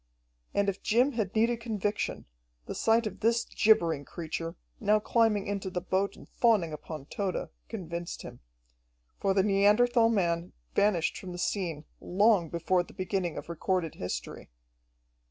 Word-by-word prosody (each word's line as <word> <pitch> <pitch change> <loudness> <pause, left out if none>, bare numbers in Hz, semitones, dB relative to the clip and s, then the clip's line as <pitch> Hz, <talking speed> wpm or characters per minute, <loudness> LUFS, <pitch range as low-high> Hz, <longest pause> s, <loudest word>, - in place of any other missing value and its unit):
And 200 0 +2
if 200 0 -1
Jim 245 +6 +3
had 220 -5 -2
needed 230 +1 +2
conviction, 210 -3 -2 0.4
the - - -5
sight 225 +1 +3
of 215 - -5
this 230 +2 +2
gibbering 165 -9 +3
creature, 165 +2 -5 0.2
now 215 0 +3
climbing 215 -2 +2
into 200 -1 -3
the 180 -1 -2
boat 190 +2 -1
and - - -14
fawning 210 -9 +2
upon 150 -1 -7
Tode, 195 +4 -3 0.2
convinced 170 -5 -5
him. - - -9 0.8
For 195 -1 +1
the 195 - +4
Neanderthal 210 +4 +4
man 170 -5 0 0.2
vanished 200 -5 +2
from 185 -2 -7
the - - -6
scene 170 -4 -2
long 195 -2 +3
before 170 +2 +1
the 175 - -11
beginning 185 -2 -2
of - - -6
recorded 170 0 -1
history. 90 - -5
195 Hz, 150 wpm, -29 LUFS, 170-215 Hz, 0.8 s, the